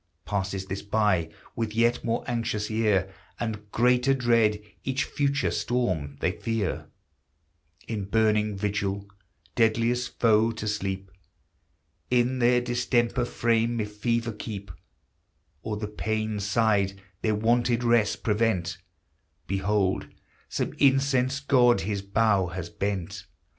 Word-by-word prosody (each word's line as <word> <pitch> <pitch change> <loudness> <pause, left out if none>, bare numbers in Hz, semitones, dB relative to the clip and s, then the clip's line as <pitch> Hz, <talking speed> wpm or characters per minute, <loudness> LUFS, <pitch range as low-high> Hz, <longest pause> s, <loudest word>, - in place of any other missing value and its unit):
Passes 95 -1 -2
this 95 +1 -4
by, 100 -5 +1 0.3
with 110 -2 -3
yet 120 +1 +2
more 115 -1 -1
anxious 115 -3 -2
ear 100 -4 +1 0.3
And 105 -3 -4
greater 125 +3 +3
dread, 115 -4 +3 0.2
each 135 +1 0
future 140 0 0
storm 90 - -1
they 90 - +2
fear; 115 0 -3 1.0
In 105 -4 -3
burning 105 0 +2
vigil, 100 0 -2 0.5
deadliest 115 +2 +1
foe 115 0 +4
to 110 -1 -5
sleep, 95 -2 -3 1.0
In 125 +1 +2
their 125 0 +4
distempered 120 0 0
frame 115 0 +1
if 105 -1 -4
fever 115 +2 0
keep, 100 -3 -7 0.9
Or 110 -1 -3
the 105 0 -4
pained 110 0 -2
side 100 -2 +1 0.2
their 110 -1 +1
wonted 120 +2 +2
rest 115 -3 +2
prevent, 105 -5 0 0.7
Behold 95 0 0 0.4
some - - -2
incensed 135 0 +2
god 125 -3 +5
his 100 +2 -2
bow 100 -1 +2
has 85 -1 -6
bent 100 +1 -3
110 Hz, 115 wpm, -26 LUFS, 100-120 Hz, 1.0 s, god